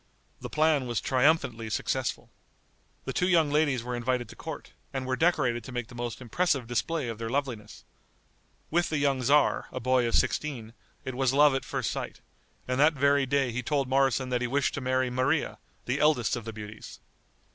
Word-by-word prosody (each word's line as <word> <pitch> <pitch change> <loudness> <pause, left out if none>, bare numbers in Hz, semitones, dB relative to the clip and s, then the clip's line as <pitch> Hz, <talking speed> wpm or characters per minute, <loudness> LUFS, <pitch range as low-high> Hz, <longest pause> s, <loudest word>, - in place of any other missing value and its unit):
The - - -7
plan 150 -4 +2
was 120 -2 -1
triumphantly 130 -4 +1
successful. 105 - -2 0.7
The - - -3
two 180 - +1
young 165 -5 +3
ladies 145 -5 +2
were 125 0 -3
invited 120 0 -1
to - - -11
court, - - -8 0.2
and 135 -1 -3
were 130 0 0
decorated 130 -8 +1
to - - -8
make 120 -2 -4
the - - -12
most 120 0 -5
impressive 140 +1 0
display 130 +4 -1
of 115 -1 -5
their 115 0 -3
loveliness. 120 -6 -4 0.9
With 175 +2 +2
the 155 - -1
young 140 -2 +1
tzar, 145 +4 +3
a - - -4
boy 130 0 +2
of 115 - 0
sixteen, 120 -7 -1 0.3
it 130 - -4
was 130 0 +1
love 145 0 +6
at 135 - -1
first - - -2
sight, - - -5 0.5
and 125 +1 -1
that 150 +3 +5
very 140 -1 +2
day 135 -2 +1
he 120 +2 -2
told 135 +2 0
Moroson 130 -1 +2
that 125 -1 0
he 125 - 0
wished 140 +2 0
to 140 - -4
marry 130 0 0
Maria, 130 +5 0 0.3
the 130 +3 -1
eldest 150 -7 +3
of 120 -2 -6
the 115 - -6
beauties. 105 0 -9
130 Hz, 195 wpm, -28 LUFS, 120-145 Hz, 0.9 s, love